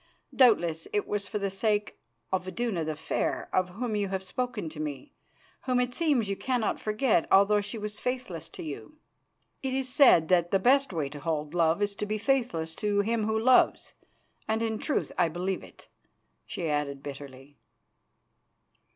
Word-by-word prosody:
Doubtless 170 - +4
it 205 - 0
was 205 -1 -2
for - - -3
the 200 -1 -2
sake 210 +1 -1 0.3
of 190 -1 -1
Iduna 185 -2 -2
the 155 0 -3
Fair, 155 - -2
of 185 -1 +2
whom 220 +4 -3
you 205 -1 0
have 190 0 -3
spoken 215 -1 -3
to 155 -1 -10
me, 155 - -5 0.5
whom 255 -1 +2
it 245 0 0
seems 280 -8 +1
you 195 - -1
cannot 245 0 -1
forget 215 -4 +1
although 200 +2 +5
she 205 +3 -5
was 210 0 -5
faithless 250 -10 -4
to - - -9
you. 160 - -8 0.6
It 265 -1 -2
is 260 -1 -2
said 175 - +6
that 175 -2 +3
the 195 - +3
best 270 +6 +3
way 160 -5 -2
to 145 +1 -9
hold 150 0 -3
love 170 +3 +2
is 205 0 0
to 210 - -3
be 215 +1 -1
faithless 220 -10 0
to 205 -1 +1
him 220 +1 0
who 220 0 +1
loves, 250 +3 +3 0.5
and 220 +1 0
in 220 -1 -2
truth 295 - -1
I 175 -2 +4
believe 180 +3 -3
it," - - -16 0.6
she 170 - -4
added 145 -2 -2
bitterly. 140 0 -10
205 Hz, 175 wpm, -28 LUFS, 165-235 Hz, 0.6 s, said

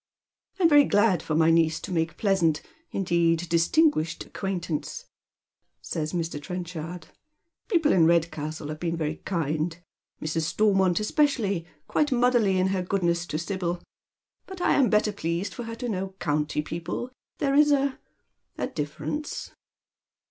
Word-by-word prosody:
" - - -40
I - - +1
am 330 - +7
very 290 -2 +7
glad 205 -3 +3
for 155 - -2
my 160 +1 +5
niece 165 -1 +3
to 195 - -7
make 165 -1 -1
pleasant 175 -7 +2
— - - -34
indeed 170 -2 +1
dis 165 0 +3
tinguished 295 - +2
acquaintance,"' 180 -5 -4 0.7
says 155 -1 -3
Mr. 165 -4 -3
Trenchard. 175 -1 -6 0.3
" 335 - -54
People 330 -8 +3
in 165 -3 +5
Redcastle 155 -2 0
have 155 0 -5
been 170 0 -2
very 155 -1 -2
kind, 160 -1 -2 0.4
Mrs. 155 +1 -1
Stoimont 195 -4 +3
especially, 215 - +1 0.2
quite 300 -1 +1
motherly 240 -6 +3
in 185 +1 +2
her 190 -1 0
goodness 175 -2 0
to 155 - -2
Sibyl. 175 0 -2 0.7
But 380 -1 -8
I - - +3
am 270 -4 +4
better 210 0 +3
pleased 180 0 -3
for 240 - -6
her 230 0 -5
to 245 +1 -5
know 190 -3 -3
county 150 -2 -1
people, 170 +10 -4 0.3
there 275 -1 0
is 295 +1 +5
a 275 -1 +1 0.3
— - - -46
a - - -1
difference." 255 - -4
180 Hz, 160 wpm, -26 LUFS, 165-220 Hz, 0.7 s, am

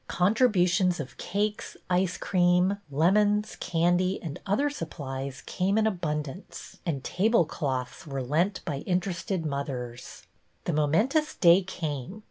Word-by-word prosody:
Contribu 200 0 +3
tions 180 0 +2
of 140 -3 -6
cakes, 205 +3 -2
ice 180 0 +1
cream, 180 +1 +2
lemons, 205 +8 +2
candy, 175 +3 +1
and 155 -4 -5
other 255 +9 +2
supplies 135 - -5
came 195 +3 0
in 220 - +3
abundance, 155 -4 -4
and 140 -5 -2
table 210 -1 +2
cloths 135 -2 -4
were 135 -2 -3
lent 165 +10 0
by 145 -4 -2
interested 180 -1 -1
mothers. 130 -4 -5 0.4
The 175 - 0
momentous 210 - +2
day 175 +1 +6
came. 160 -1 -5
175 Hz, 125 wpm, -27 LUFS, 145-200 Hz, 0.4 s, day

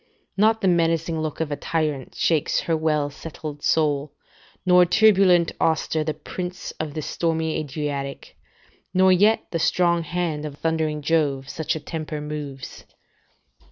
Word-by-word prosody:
["Not 220 +2 +3
the 195 - +2
menacing 165 -2 +1
look 155 -1 -4
of 155 -2 -2
a - - 0
tyrant 150 -4 -2
shakes 160 -3 +1
her 165 - 0
well 150 -2 0
settled 150 -1 -8
soul, 150 -2 +1 0.5
nor 180 -1 +6
turbulent 185 -2 +4
Auster, 160 0 +1
the 155 -1 -2
prince 180 +4 -6
of 155 -2 -4
the 155 - -3
stormy 160 0 -1
Adriatic, 145 -2 -5 0.6
nor 185 0 +5
yet 205 +5 +4
the 165 - -1
strong 170 +1 +2
hand 165 -2 -2
of 150 -2 -6
thundering 155 -2 -1
Jove, 140 -4 0
such 160 +1 -2
a - - -3
temper 155 0 -5
moves." 150 -3 -7
160 Hz, 145 wpm, -23 LUFS, 150-170 Hz, 0.6 s, nor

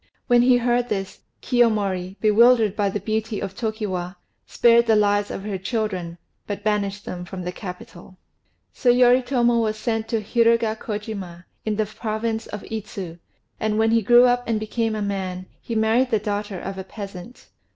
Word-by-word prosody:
When 245 -2 +4
he 250 0 +5
heard 245 0 +1
this, 195 -2 -3 0.2
Kiyomori, 200 -6 +1
bewildered 220 -1 +4
by 205 -2 +1
the 205 - -3
beauty 220 +1 -2
of 195 -1 -5
Tokiwa, 195 -5 -3 0.3
spared 235 0 +4
the 220 - +5
lives 205 -1 +2
of 195 - -5
her 200 -2 -4
children, 190 -5 -3 0.3
but 205 - -5
banished 205 -1 -1
them 175 -1 -5
from 185 0 -7
the 180 - -3
capital. 180 -1 -10 0.6
So 250 - +1
Yoritomo 245 -1 +4
was 215 -1 -1
sent 225 0 -2
to 225 - 0
Hirugakojima, 215 -5 -1 0.2
in 215 -1 0
the 215 0 0
province 220 +1 -3
of 210 - -7
Idzu; 200 -6 -6 0.4
and 215 -1 0
when 220 0 +3
he 230 0 +4
grew 240 +4 +6
up 245 0 +2
and 225 -2 0
became 220 +1 -2
a 210 - -2
man, 190 -2 -3 0.2
he 230 - -5
married 225 +4 +2
the 225 - +2
daughter 205 -2 -3
of 195 +1 -6
a - - -4
peasant. 195 +2 -10
215 Hz, 170 wpm, -23 LUFS, 195-230 Hz, 0.6 s, grew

